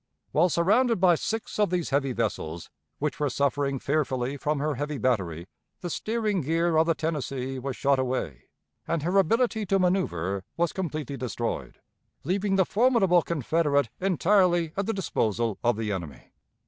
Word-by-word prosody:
While 170 +4 +3
surrounded 215 +8 +3
by 180 -1 +5
six 220 +6 -3
of 210 - +3
these 175 -3 -1
heavy 135 -1 +1
vessels 85 -8 -3 0.3
which 150 0 -2
were 145 -1 +1
suffering 140 +1 0
fearfully 135 -2 -1
from 150 +2 -1
her 150 +2 -1
heavy 145 +2 -3
battery, 90 -11 -1 0.4
the 175 - -4
steering 215 -2 -1
gear 165 +3 +1
of 160 +1 +4
the 165 - +2
Tennessee 135 -4 -3
was 135 0 -4
shot 140 -1 +2
away, 125 - -3 0.4
and 165 -3 -1
her 175 +4 -1
ability 225 +4 +2
to 195 - +3
manoeuvre 100 - 0 0.2
was 170 0 +1
completely 155 -6 -4
destroyed, 120 -2 -4 0.4
leaving 195 +4 0
the 190 -1 +4
formidable 210 -6 +3
Confederate 150 -4 +1
entirely 180 -2 +2
at 200 0 -2
the 225 - 0
disposal 115 - -1
of 120 -2 +2
the 110 -2 -2
enemy. 85 -9 -7
155 Hz, 160 wpm, -27 LUFS, 130-185 Hz, 0.4 s, by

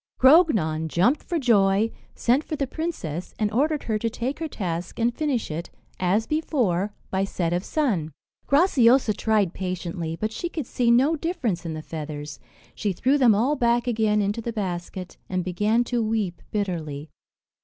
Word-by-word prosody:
Grognon 220 - +4
jumped 190 - +2
for 345 - -2
joy, 215 -5 +3 0.2
sent 255 +5 +2
for 310 - -4
the 280 - -1
princess, 250 - -5
and 210 -1 0
ordered 295 +6 +1
her 215 -2 -1
to 230 - 0
take 250 +6 -4
her 325 - -2
task, 175 - -4
and 235 +1 +1
finish 270 - -1
it, 165 +3 -5 0.3
as 190 +5 +2
before, 225 - 0 0.2
by 190 0 +1
set 175 -3 -1
of 175 +1 -1
sun. 205 - 0 0.4
Graciosa 265 - +4
tried 210 -4 +1
patiently, 175 -3 -4
but 215 +5 -3
she 345 +9 -4
could 310 -5 -4
see 240 0 0
no 265 +7 +4
difference 260 - -2
in 160 - -4
the 155 - -6
feathers; 150 -2 -6 0.3
she 205 -2 -2
threw 265 +10 +2
them 235 -5 +6
all 250 +8 +2
back 240 -2 +2
again 215 -3 +2
into 205 +3 -1
the 235 - -3
basket, 185 -3 -5
and 185 -1 -1
began 210 +6 +1
to 240 -1 -1
weep 215 -6 -1
bitterly. 160 -8 -3
215 Hz, 170 wpm, -25 LUFS, 180-255 Hz, 0.4 s, them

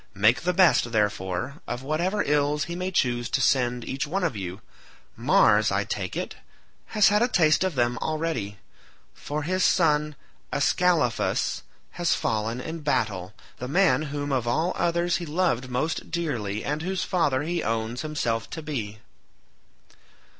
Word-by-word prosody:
Make 110 +5 +4
the 180 - +1
best, 175 -9 +4
therefore, 105 - -1
of 125 +1 -4
whatever 175 +8 0
ills 145 0 +1
he 170 - -5
may 185 +1 -2
choose 120 -9 0
to - - 0
send 125 -2 +1
each 135 +3 -2
one 185 +5 -1
of 165 -9 0
you; 95 0 -6 0.5
Mars, 105 0 +4
I 100 +1 +1
take 95 -3 -4
it, - - -3 0.6
has 210 - +7
had 210 +1 +3
a 240 - +4
taste 160 -8 +3
of 185 -4 -1
them 120 -1 +1
already, 155 -11 -2 0.6
for 150 +1 -4
his 185 +4 0
son 150 -3 +2 0.4
Ascalaphus 155 -4 +1 0.3
has 175 -1 +1
fallen 110 +2 -1
in 160 +6 -5
battle—the 110 - -3
man 180 +4 +3
whom 145 0 -3
of 125 -3 0
all 160 +9 +1
others 170 0 +1
he 175 - -5
loved 150 -6 0
most 125 +6 -2
dearly 115 -12 -2
and 150 +2 -2
whose 185 +2 -2
father 145 -7 +1
he 170 +2 -1
owns 115 +2 -2
himself 120 -8 -2
to 160 - -6
be." 115 -9 -4
145 Hz, 155 wpm, -26 LUFS, 115-170 Hz, 0.6 s, has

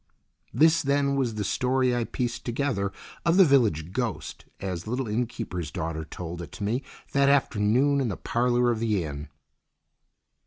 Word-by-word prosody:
This, 160 +2 +4
then, 140 0 +1
was 125 -5 0
the 105 - -2
story 125 +3 +1
I 120 -1 0
pieced 120 -2 -3
together 120 -6 -1 0.3
of 170 +1 +3
the 190 - +8
village 110 - +2
ghost 105 - -4
as 90 -3 -3
the - - -8
little 125 +1 -1
inn 115 +3 0
keeper's 90 -8 -5
daughter 80 +1 -4
told 85 +1 -7
it 85 - -8
to - - -6
me 115 +6 0 0.3
that 140 0 +4
afternoon 135 +1 +3
in 130 - 0
the 100 - -3
parlour 120 0 +1
of 115 - -2
the 105 -5 +1
inn. 75 -2 -6
120 Hz, 170 wpm, -26 LUFS, 95-135 Hz, 0.3 s, the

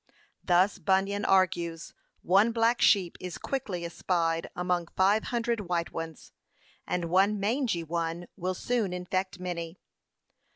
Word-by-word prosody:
Thus 185 +3 +3
Bunyan 195 +3 +1
argues, 175 -3 +1 0.3
'One 200 +6 +4
black 230 +1 +2
sheep 185 -5 +4
is 180 -1 -6
quickly 200 -11 -3
espied 165 -1 -1
among 180 -1 -1
five 200 +3 +3
hundred 235 -5 -2
white 170 -1 -1
ones, 165 -2 -7 0.6
and 175 -1 -1
one 200 +3 +3
mangey 220 -4 0
one 165 +1 -3
will 185 -1 -2
soon 225 -3 -1
infect 185 +1 -3
many. 175 -1 -5
185 Hz, 125 wpm, -28 LUFS, 170-205 Hz, 0.6 s, One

